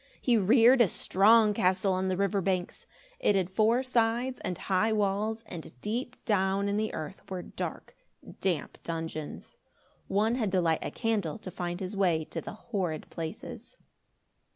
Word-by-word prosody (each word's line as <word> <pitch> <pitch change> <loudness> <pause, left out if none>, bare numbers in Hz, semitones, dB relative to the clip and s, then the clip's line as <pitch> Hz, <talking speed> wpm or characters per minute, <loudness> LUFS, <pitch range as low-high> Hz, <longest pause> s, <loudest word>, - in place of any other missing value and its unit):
He 245 - +2
reared 235 +5 +6
a 230 - +6
strong 210 +5 +4
castle 190 0 +2
on 185 +1 0
the 185 -1 0
river 200 0 +1
banks. 185 -1 -2 0.3
It 205 - +3
had 190 -1 0
four 225 +5 +3
sides 245 +1 0
and 180 - -3
high 200 +3 +1
walls, 215 +2 0
and 170 -6 -8
deep 245 +4 -3
down 195 -1 +1
in 200 - 0
the 215 0 -1
earth 155 +3 -6
were 185 -2 -4
dark, - - -6 0.4
damp 175 -6 -2
dungeons. 160 -2 -6 0.5
One 210 +4 +2
had 225 -6 0
to 185 - +4
light 165 -2 +2
a - - -2
candle 215 -9 -1
to 195 -4 -8
find 175 0 -4
his 190 +1 -5
way 175 -5 +2
to 165 - -3
the - - -7
horrid 190 -8 -4
places. 160 -2 -7
195 Hz, 165 wpm, -29 LUFS, 180-220 Hz, 0.5 s, reared